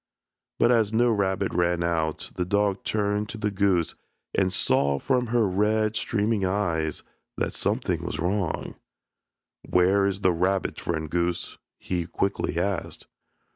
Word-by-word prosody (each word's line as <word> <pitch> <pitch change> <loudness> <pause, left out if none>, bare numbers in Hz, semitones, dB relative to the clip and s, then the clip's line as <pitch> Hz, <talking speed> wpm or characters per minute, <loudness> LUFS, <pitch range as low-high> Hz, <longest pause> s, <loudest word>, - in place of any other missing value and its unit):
But 120 - +4
as 110 -4 +3
no 120 +2 +3
rabbit 95 -3 0
ran 85 0 +1
out 80 -2 -1
the 90 - -1
dog 100 +1 0
turned 105 0 0
to - - -6
the 105 -1 -1
goose 95 -4 +1 0.4
and 95 -1 +2
saw 70 -6 +2
from 125 - 0
her 115 -2 +2
red, 105 +3 +1
streaming 105 -2 0
eyes 85 -5 -1 0.3
that - - -1
something - - -1
was - - -4
wrong. 90 0 -1 0.9
"Where 95 +2 +3
is 100 0 -2
the 90 - +4
rabbit, 95 +3 0
friend 80 -2 -2
goose?" 85 +2 -2 0.2
he 85 -2 -3
quickly 95 -1 -1
asked. 95 -2 -3
95 Hz, 140 wpm, -26 LUFS, 85-105 Hz, 0.9 s, But